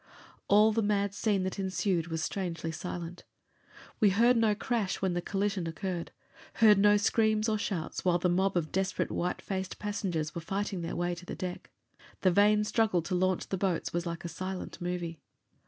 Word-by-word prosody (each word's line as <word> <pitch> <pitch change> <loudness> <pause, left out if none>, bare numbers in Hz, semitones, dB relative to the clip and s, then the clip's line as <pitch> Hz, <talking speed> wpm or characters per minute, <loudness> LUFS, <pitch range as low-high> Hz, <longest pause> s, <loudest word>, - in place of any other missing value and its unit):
All 210 +2 +6
the 225 +1 +1
mad 205 -1 +1
scene 200 -2 +1
that 190 +2 -3
ensued 185 -2 0
was 165 -1 -3
strangely 170 -4 -3
silent. 175 +1 -6 0.8
We 210 - +5
heard 235 +6 +4
no 225 -2 +3
crash 220 -2 -1
when 190 -2 0
the 175 - -1
collision 195 -2 -1
occurred; 175 +1 -4 0.4
heard 215 -3 +6
no 205 +1 +6
screams 215 +1 +2
or 215 -1 +1
shouts 175 -6 -3
while 180 -1 +3
the 175 - +1
mob 190 +2 +2
of 160 -3 -1
desperate, 190 0 -1
white 180 - -2
faced 190 -1 -4
passengers 185 -7 -2
were 170 - -4
fighting 195 +1 -3
their 165 - -4
way 175 0 0
to 175 +1 -9
the - - -5
deck. 180 -1 -6 0.5
The 185 - +4
vain 210 +3 +4
struggle 210 -5 +1
to 185 - -4
launch 185 0 +1
the 190 - -1
boats 185 -4 -1
was 175 0 -1
like 170 0 -5
a - - -1
silent 185 +3 -6
movie. 175 -2 -3
190 Hz, 190 wpm, -30 LUFS, 175-205 Hz, 0.8 s, All